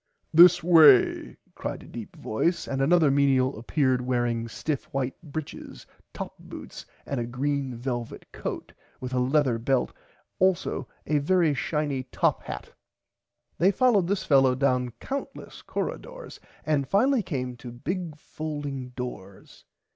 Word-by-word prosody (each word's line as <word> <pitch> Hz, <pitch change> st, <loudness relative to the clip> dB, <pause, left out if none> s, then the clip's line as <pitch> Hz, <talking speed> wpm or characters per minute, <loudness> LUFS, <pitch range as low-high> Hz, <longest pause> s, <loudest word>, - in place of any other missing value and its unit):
This 175 Hz, +1 st, +8 dB
way 155 Hz, -7 st, +5 dB, 0.2 s
cried -, -, -5 dB
a -, -, -14 dB
deep 115 Hz, -3 st, -9 dB
voice 170 Hz, +11 st, -1 dB
and 135 Hz, -1 st, -2 dB
another 160 Hz, 0 st, +4 dB
menial 135 Hz, -3 st, +2 dB
apeared 130 Hz, +1 st, +1 dB
wearing 120 Hz, -2 st, -1 dB
stiff 145 Hz, +5 st, -3 dB
white 135 Hz, -1 st, -3 dB
britches 155 Hz, -2 st, -8 dB, 0.3 s
top -, -, -6 dB
boots -, -, -10 dB, 0.2 s
and 140 Hz, -, -3 dB
a 120 Hz, -, -3 dB
green 135 Hz, +1 st, -2 dB
velvit 120 Hz, -1 st, -4 dB
coat -, -, -6 dB, 0.3 s
with 130 Hz, 0 st, -6 dB
a 125 Hz, -, +1 dB
leather 130 Hz, -2 st, +2 dB
belt 130 Hz, +2 st, 0 dB, 0.5 s
also 185 Hz, -1 st, +1 dB, 0.2 s
a 150 Hz, -1 st, +1 dB
very 165 Hz, +1 st, +2 dB
shiny 145 Hz, 0 st, -1 dB
top 130 Hz, -, 0 dB
hat. 65 Hz, -, -8 dB, 0.9 s
They 180 Hz, -, +5 dB
followed 205 Hz, -3 st, +3 dB
this 200 Hz, +1 st, -1 dB
fellow 135 Hz, -3 st, +4 dB
down 125 Hz, -2 st, +1 dB
countless 275 Hz, +1 st, -6 dB
corridoors -, -, -6 dB, 0.3 s
and 145 Hz, -3 st, +1 dB
finally 250 Hz, +5 st, +3 dB
came 130 Hz, -9 st, -4 dB
to 120 Hz, 0 st, -9 dB
big 160 Hz, +6 st, -5 dB
folding 145 Hz, -4 st, -6 dB
doors. 100 Hz, -7 st, -8 dB
140 Hz, 135 wpm, -26 LUFS, 125-160 Hz, 0.9 s, This